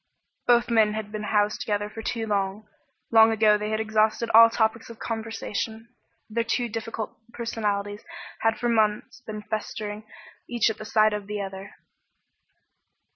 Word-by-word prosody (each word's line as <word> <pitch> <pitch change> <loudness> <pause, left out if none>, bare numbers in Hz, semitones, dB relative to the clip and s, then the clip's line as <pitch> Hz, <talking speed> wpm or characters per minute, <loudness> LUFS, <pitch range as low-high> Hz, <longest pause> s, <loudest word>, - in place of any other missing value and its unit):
Both 240 0 +4
men 220 -2 +4
had 215 -1 -5
been 215 -1 -4
housed 210 0 +1
together 205 -1 -1
for 225 +1 -8
too 225 0 -2
long. 200 0 -2 0.4
Long 225 0 +7
ago 215 -1 +4
they 210 0 -2
had 215 0 -1
exhausted 220 +1 +1
all 230 +1 +9
topics 225 0 0
of 230 - -10
conversation, 225 0 -4 0.4
their 230 +1 -1
two 235 +1 -1
difficult 225 0 -5
personalities 205 -3 -2 0.4
had 225 0 +1
for 240 - -1
months 220 +2 +1
been 215 -3 -7
festering, 215 0 -5 0.4
each 235 -2 +2
at 220 - -9
the 215 - -7
sight 215 0 +3
of 205 -1 -4
the 210 0 -4
other. 195 0 -7
220 Hz, 155 wpm, -26 LUFS, 210-225 Hz, 0.4 s, all